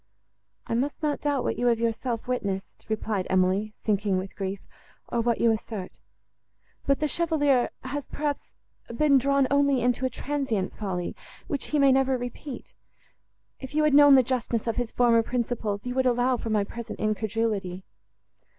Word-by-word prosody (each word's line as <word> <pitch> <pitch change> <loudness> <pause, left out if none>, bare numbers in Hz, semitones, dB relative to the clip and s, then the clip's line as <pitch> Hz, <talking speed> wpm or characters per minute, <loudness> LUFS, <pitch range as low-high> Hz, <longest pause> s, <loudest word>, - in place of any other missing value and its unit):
"I - - -3
must 275 +6 -1
not 295 -1 0
doubt 285 -3 0
what - - -2
you 245 - +2
have 235 -1 +3
yourself 230 +1 -2
witnessed," 200 -6 -3
replied 215 -3 -1
Emily, 190 +3 +1
sinking 200 -2 +1
with 190 +1 -5
grief, 195 0 -3 0.5
"or 235 - 0
what 235 0 +1
you 230 - +4
assert. 215 -3 -5 0.9
But 275 -1 +3
the 305 - +1
Chevalier 290 -5 +2
has, 280 +2 -4
perhaps, 290 -1 -3 0.4
been 280 +3 +3
drawn 275 +1 +2
only 280 -2 +3
into 245 +1 +1
a 260 - +2
transient 255 -7 -2
folly, 185 -4 -3 0.3
which 285 - -3
he 300 - -1
may 275 -2 +5
never 265 0 +3
repeat. 245 +3 -7 0.9
If 265 +1 -8
you 305 - +3
had 305 -2 +3
known 290 -1 +8
the 260 - +6
justness 240 -2 -1
of 230 -2 -2
his 245 -2 -2
former 235 -2 +4
principles, 230 -3 -2
you 245 - -2
would 260 0 +2
allow 250 +1 +2
for 230 - -5
my 210 -2 +2
present 230 +2 -7
incredulity." 215 -3 -1
245 Hz, 170 wpm, -26 LUFS, 215-275 Hz, 0.9 s, known